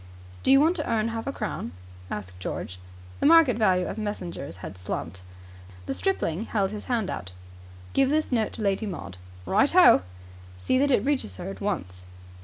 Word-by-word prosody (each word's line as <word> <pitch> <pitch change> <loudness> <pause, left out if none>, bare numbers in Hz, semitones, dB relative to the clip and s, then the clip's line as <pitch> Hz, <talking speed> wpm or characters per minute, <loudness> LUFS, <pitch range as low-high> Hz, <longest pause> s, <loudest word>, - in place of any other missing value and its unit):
"Do - - 0
you 270 +1 +8
want 320 +5 +4
to 305 - -3
earn 225 0 +1
half 225 +1 -5
a - - 0
crown?" 210 - -4 0.4
asked 95 -3 -6
George. 90 0 -5 0.4
The - - +3
market 320 -7 +7
value 185 -5 +2
of - - -5
messengers 180 - -5
had - - -7
slumped. 90 0 -5 0.6
The 135 - -2
stripling 215 - -1
held 200 -4 0
his 210 -1 -7
hand 230 -6 -1
out. 90 +1 -6 0.6
"Give 270 -1 +3
this 310 0 0
note 225 -3 +1
to 220 - -5
Lady 200 +2 0
Maud." 95 - -7 0.3
"Right 270 +9 +3
ho!" 360 - +7 0.6
"See 90 - +1
that 285 +1 +3
it 250 -4 +3
reaches 265 - -1
her 190 - -5
at - - -10
once." 90 - -3
210 Hz, 185 wpm, -26 LUFS, -, 0.6 s, you